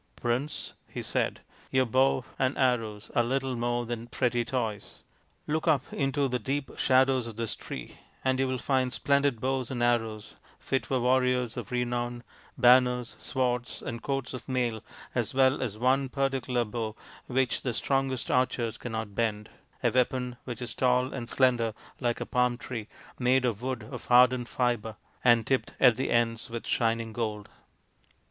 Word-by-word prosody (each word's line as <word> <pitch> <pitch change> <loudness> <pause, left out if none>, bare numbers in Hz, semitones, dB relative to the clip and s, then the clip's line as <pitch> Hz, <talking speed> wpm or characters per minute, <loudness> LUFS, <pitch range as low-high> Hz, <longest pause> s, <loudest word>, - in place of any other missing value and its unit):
" - - -41
Prince/' 125 +6 -2
he - - -6
said, - - -1 0.2
" - - -27
your 130 0 +3
bow 130 +1 +2
and 130 +1 +1
arrows 115 -5 0
are - - +5
little 130 +2 -1
more 120 0 -1
than 120 0 -5
pretty 120 -1 0
toys. 115 -4 -4 0.4
Look 155 +3 -1
up 145 -4 +2
into 140 0 +1
the 125 -1 -1
deep 135 +3 -2
shadows 130 -2 +3
of 115 - -7
this 115 0 -2
tree - - -8 0.3
and 130 0 +2
you 135 - +2
will 130 0 -1
find 130 0 +1
splendid 140 -3 +2
bows 130 0 -1
and 120 -2 -2
arrows 115 -3 0 0.2
fit 135 - -1
for 130 - +1
warriors 125 -1 +2
of - - -6
renown, 120 0 -2 0.3
banners, 125 -1 +4
swords, 125 -2 -1
and 115 -1 -5
coats 135 -1 -2
of 130 - -8
mail, 120 -4 0 0.3
as 120 -1 -1
well 130 +1 +4
as 115 -5 -3
one 130 +3 +2
particular 135 -3 0
bow 110 0 -4 0.3
which 130 -1 +1
the 125 - -1
strongest 135 0 0
archers 125 -3 +1
cannot 110 -3 -4
bend, 105 -1 -1 0.3
a - - +3
weapon 125 0 +1
which 120 -1 -5
is 120 - -4
tall 125 +1 +2
and 120 -3 -5
slender 120 -4 +2 0.2
like 120 -2 0
a - - -3
palm 125 -1 +1
tree, 115 -3 -6 0.3
made 125 +1 +3
of 115 -3 -1
wood 130 -3 -3
of 125 +3 -8
hardened 125 0 +5
fibre, 120 -3 0 0.3
and 120 -2 +5
tipped 135 -1 0
at 125 -3 +7
the 130 +3 -2
ends 115 0 +1
with 115 0 -5
shining 115 -1 0
gold." 105 -3 -3
125 Hz, 170 wpm, -28 LUFS, 115-130 Hz, 0.4 s, at